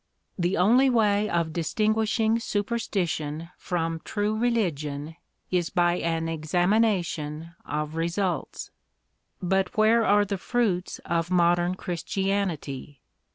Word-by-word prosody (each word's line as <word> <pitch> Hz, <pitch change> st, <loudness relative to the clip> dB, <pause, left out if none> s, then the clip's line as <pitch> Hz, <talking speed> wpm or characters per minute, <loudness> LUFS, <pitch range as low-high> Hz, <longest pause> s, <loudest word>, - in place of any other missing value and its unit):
The 175 Hz, 0 st, 0 dB
only 245 Hz, +9 st, +5 dB
way 210 Hz, -3 st, +2 dB
of 170 Hz, -2 st, 0 dB
distinguishing 220 Hz, +6 st, +1 dB
superstition 180 Hz, -8 st, -2 dB
from 165 Hz, -2 st, -2 dB
true 210 Hz, +1 st, -1 dB
religion 160 Hz, -10 st, -1 dB, 0.4 s
is 175 Hz, -2 st, +1 dB
by 175 Hz, 0 st, +2 dB
an 165 Hz, -1 st, -1 dB
examination 170 Hz, -1 st, 0 dB
of 150 Hz, +1 st, -3 dB
results. 170 Hz, +3 st, -2 dB, 0.7 s
But 190 Hz, +3 st, 0 dB
where 225 Hz, +2 st, +5 dB
are 205 Hz, -1 st, +4 dB
the 200 Hz, -1 st, -3 dB
fruits 200 Hz, -6 st, 0 dB
of 170 Hz, 0 st, -1 dB
modern 175 Hz, 0 st, +3 dB
Christianity? 175 Hz, -7 st, -3 dB
180 Hz, 105 wpm, -26 LUFS, 165-210 Hz, 0.7 s, only